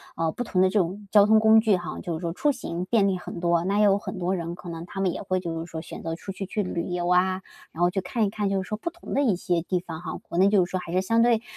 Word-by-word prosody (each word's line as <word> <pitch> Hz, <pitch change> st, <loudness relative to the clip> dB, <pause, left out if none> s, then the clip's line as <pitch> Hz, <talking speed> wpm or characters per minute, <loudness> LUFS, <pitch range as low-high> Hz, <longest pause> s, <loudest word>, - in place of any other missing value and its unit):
呃， 165 Hz, -1 st, 0 dB
不 245 Hz, -, -4 dB
同 185 Hz, -6 st, 0 dB
的 190 Hz, -, +5 dB
这 205 Hz, +2 st, +2 dB
种 195 Hz, +4 st, -2 dB
交 205 Hz, -1 st, +7 dB
通 220 Hz, +1 st, +5 dB
工 220 Hz, 0 st, +6 dB
具 215 Hz, -3 st, +3 dB
哈， 175 Hz, 0 st, -6 dB
就 170 Hz, -, -4 dB
是 160 Hz, -, -3 dB
说 170 Hz, -1 st, -2 dB
出 295 Hz, -, +1 dB
行 180 Hz, -9 st, -4 dB
便 205 Hz, 0 st, +3 dB
利 190 Hz, -2 st, +1 dB
很 175 Hz, -, -7 dB
多， 170 Hz, -1 st, +2 dB
那 200 Hz, +2 st, +1 dB
也 210 Hz, -, +5 dB
有 200 Hz, -1 st, +5 dB
很 200 Hz, -1 st, -6 dB
多 180 Hz, +2 st, 0 dB
人 170 Hz, -1 st, -4 dB
可 175 Hz, 0 st, -9 dB
能 165 Hz, 0 st, -6 dB
他 195 Hz, +1 st, -5 dB
们 185 Hz, -, +2 dB
也 -, -, -5 dB
会 185 Hz, -1 st, 0 dB
就 165 Hz, -2 st, -4 dB
是 165 Hz, -, -5 dB
说， 160 Hz, -2 st, -6 dB
选 -, -, -9 dB
择 165 Hz, 0 st, -3 dB
出 195 Hz, -, -7 dB
去 195 Hz, +1 st, -5 dB
去 210 Hz, +3 st, -2 dB
旅 170 Hz, -3 st, -2 dB
游 175 Hz, -1 st, -2 dB
啊， 185 Hz, +1 st, +2 dB, 0.3 s
然 165 Hz, -, -7 dB
后 175 Hz, -, +5 dB
去 190 Hz, +1 st, -2 dB
看 230 Hz, +4 st, -1 dB
一 -, -, 0 dB
看 205 Hz, -1 st, -2 dB
就 195 Hz, -1 st, 0 dB
是 190 Hz, -, -8 dB
说 215 Hz, -, -2 dB
不 340 Hz, +10 st, -4 dB
同 345 Hz, +1 st, -9 dB
的 280 Hz, -, +3 dB
一 220 Hz, -9 st, +3 dB
些 175 Hz, -1 st, 0 dB
地 180 Hz, +1 st, -1 dB
方 165 Hz, -2 st, -7 dB
哈， 175 Hz, -, -5 dB
国 170 Hz, -, -4 dB
内 190 Hz, +2 st, +6 dB
就 200 Hz, -3 st, +4 dB
是 175 Hz, -, -12 dB
说 185 Hz, -, -2 dB
还 175 Hz, -, -8 dB
是 185 Hz, +2 st, +2 dB
相 230 Hz, +4 st, +2 dB
对 235 Hz, -2 st, +3 dB
185 Hz, 360 characters per minute, -25 LUFS, 175-205 Hz, 0.3 s, 交